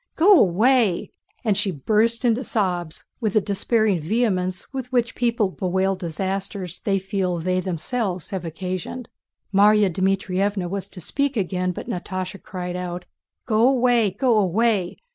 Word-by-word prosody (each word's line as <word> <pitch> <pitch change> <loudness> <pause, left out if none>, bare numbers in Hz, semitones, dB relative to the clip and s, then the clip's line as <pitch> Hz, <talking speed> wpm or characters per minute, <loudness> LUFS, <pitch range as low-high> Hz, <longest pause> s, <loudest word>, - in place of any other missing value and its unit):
Go 380 +6 +6
away!" 215 +1 +3 0.3
And 210 -3 +3
she 205 0 0
burst 220 - +1
into 240 +2 +2
sobs 180 -8 -2
with 215 -5 -1
the 215 - +5
despairing 210 -1 +1
vehemence 185 - -1
with 260 -1 -5
which 240 -2 +1
people 235 -4 +1
bewail 190 +1 0
disasters 190 +1 -4
they 195 -1 0
feel 190 -2 -1
they 180 +2 -1
have 185 - -2
themselves 185 +1 -2
occasioned. 185 +6 -5 0.4
Márya 205 0 +5
Dmítrievna 190 +1 0
was 195 +1 -4
to 180 - -10
speak 280 - -1
again 185 -2 -1
but - - -7
Natásha 185 +1 -5
cried 180 -1 -5
out: 180 0 -5 0.4
"Go 225 +1 +4
away! 245 -4 +3
Go 225 +3 +2
away! 200 -1 +1
195 Hz, 145 wpm, -23 LUFS, 180-225 Hz, 0.4 s, Go